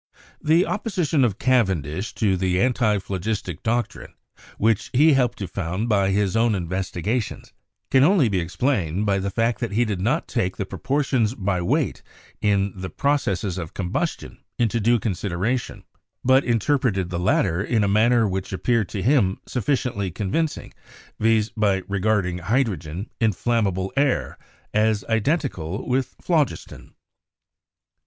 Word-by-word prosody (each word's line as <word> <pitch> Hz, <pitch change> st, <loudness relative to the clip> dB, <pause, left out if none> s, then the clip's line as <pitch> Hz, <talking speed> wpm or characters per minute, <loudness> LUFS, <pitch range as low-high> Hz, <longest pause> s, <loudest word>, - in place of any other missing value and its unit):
The 165 Hz, +4 st, +3 dB
opposition 180 Hz, -, 0 dB
of 110 Hz, -5 st, +1 dB
Cavendish 95 Hz, -, 0 dB
to 100 Hz, -4 st, +2 dB
the 90 Hz, 0 st, 0 dB
antiphlogistic 105 Hz, -6 st, -1 dB
doc 120 Hz, +1 st, 0 dB
trine, -, -, -13 dB, 0.4 s
which 110 Hz, +1 st, +1 dB
he 150 Hz, +4 st, +5 dB
helped 125 Hz, -3 st, +1 dB
to 100 Hz, -, -4 dB
found 95 Hz, +5 st, -3 dB
by 100 Hz, -3 st, +3 dB
his 100 Hz, 0 st, +1 dB
own 115 Hz, -1 st, +3 dB
investigations, 95 Hz, +5 st, -3 dB, 0.4 s
can 130 Hz, 0 st, +5 dB
only 165 Hz, -4 st, +4 dB
be 100 Hz, -4 st, 0 dB
explained 95 Hz, -, -1 dB
by 100 Hz, -1 st, +1 dB
the 100 Hz, +1 st, -2 dB
fact 115 Hz, +3 st, 0 dB
that 115 Hz, -4 st, -3 dB
he 120 Hz, +3 st, +2 dB
did 100 Hz, -5 st, -3 dB
not 130 Hz, -, 0 dB
take 95 Hz, -7 st, -1 dB
the 100 Hz, -, -2 dB
proportions 130 Hz, -1 st, 0 dB
by 95 Hz, -4 st, -1 dB
weight 85 Hz, -, 0 dB, 0.4 s
in 100 Hz, -2 st, +1 dB
the 95 Hz, 0 st, -6 dB
processes 100 Hz, -, -1 dB
of 80 Hz, -2 st, -7 dB
combustion 90 Hz, -2 st, -3 dB, 0.2 s
into 115 Hz, -1 st, +1 dB
due 120 Hz, +3 st, +3 dB
consideration, 100 Hz, +3 st, -2 dB, 0.4 s
but 130 Hz, +2 st, +4 dB
interpreted 115 Hz, -6 st, 0 dB
the 85 Hz, -, -2 dB
latter 90 Hz, 0 st, +1 dB
in 110 Hz, 0 st, +1 dB
a -, -, +2 dB
manner 110 Hz, +3 st, +3 dB
which 95 Hz, -1 st, -3 dB
appeared 110 Hz, +1 st, 0 dB
to 95 Hz, -, -4 dB
him 110 Hz, -8 st, +3 dB
sufficiently 120 Hz, -5 st, -1 dB
convincing, 105 Hz, -, -2 dB, 0.5 s
viz., 110 Hz, 0 st, +2 dB
by 100 Hz, -4 st, +1 dB
regarding 100 Hz, -3 st, 0 dB
hydrogen, 95 Hz, -, -1 dB
"inflammable 105 Hz, -4 st, 0 dB
air," 140 Hz, -1 st, 0 dB, 0.3 s
as 110 Hz, -1 st, +2 dB
identical 115 Hz, -, -1 dB
with 130 Hz, +1 st, -1 dB
phlogiston. 155 Hz, -7 st, -2 dB
105 Hz, 140 wpm, -23 LUFS, 95-125 Hz, 0.5 s, he